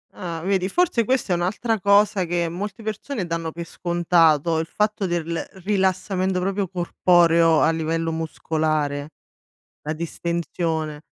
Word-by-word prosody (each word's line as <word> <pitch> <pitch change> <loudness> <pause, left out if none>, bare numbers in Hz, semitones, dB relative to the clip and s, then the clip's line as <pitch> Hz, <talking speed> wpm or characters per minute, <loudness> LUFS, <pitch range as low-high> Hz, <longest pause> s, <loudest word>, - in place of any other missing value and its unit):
Ah, 170 -3 -5
vedi 190 -1 +1
forse 325 - +2
questa 255 -6 +1
è - - +3
un'altra 205 +6 -1
cosa 200 -1 +3
che 170 0 0
molte 195 +5 -5
persone 215 +1 -4
danno 165 -1 -3
per 170 +1 -7
scontato, 165 -2 +2
il 160 - -3
fatto 210 +1 -1
del 170 -1 -2 0.2
rilassamento 190 -1 0
proprio 195 +1 -1
corporeo 170 -2 +3
a 160 - +4
livello 165 0 -1
muscolare, 155 -2 -2 0.7
la 155 - -3
distensione. 165 -2 -3
175 Hz, 130 wpm, -23 LUFS, 165-195 Hz, 0.7 s, a